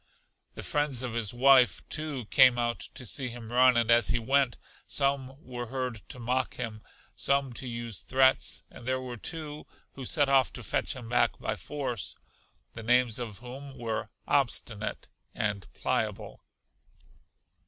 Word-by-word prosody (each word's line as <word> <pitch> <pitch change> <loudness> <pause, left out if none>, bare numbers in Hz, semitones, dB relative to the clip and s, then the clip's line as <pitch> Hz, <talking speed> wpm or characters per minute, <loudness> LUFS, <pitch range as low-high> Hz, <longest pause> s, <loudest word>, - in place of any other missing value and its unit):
The - - -6
friends 145 -4 +2
of 125 -3 -3
his 115 -4 0
wife, 130 0 +5
too, 150 -6 -3
came 130 -2 +7
out 120 0 0 0.2
to 130 - -7
see 125 +6 -1
him 115 -1 -9
run, 125 0 +5
and 115 -1 +3
as 115 -2 +6
he 120 - +2
went, 135 +1 +2 0.3
some 135 -2 0
were 120 -1 -6
heard 125 -3 -3
to - - -8
mock 125 +2 -1
him, 110 -3 -5 0.3
some 140 -2 +1
to 130 - -4
use 115 -3 -4
threats, 130 0 +3
and 120 - -12
there 130 0 +1
were 125 -1 -6
two 150 +4 -6 0.3
who 135 - -8
set 145 +2 +3
off 135 -2 +4
to - - -8
fetch - - -1
him 125 -3 -8
back 120 +1 +2
by - - -2
force, 130 - -4 0.6
the 115 - -7
names 120 0 +3
of 110 -5 -5
whom 135 +2 -9
were 115 -2 -3 0.2
Obstinate - - -1 0.3
and 105 -3 -2
Pliable. - - -2
125 Hz, 160 wpm, -29 LUFS, 120-135 Hz, 0.6 s, came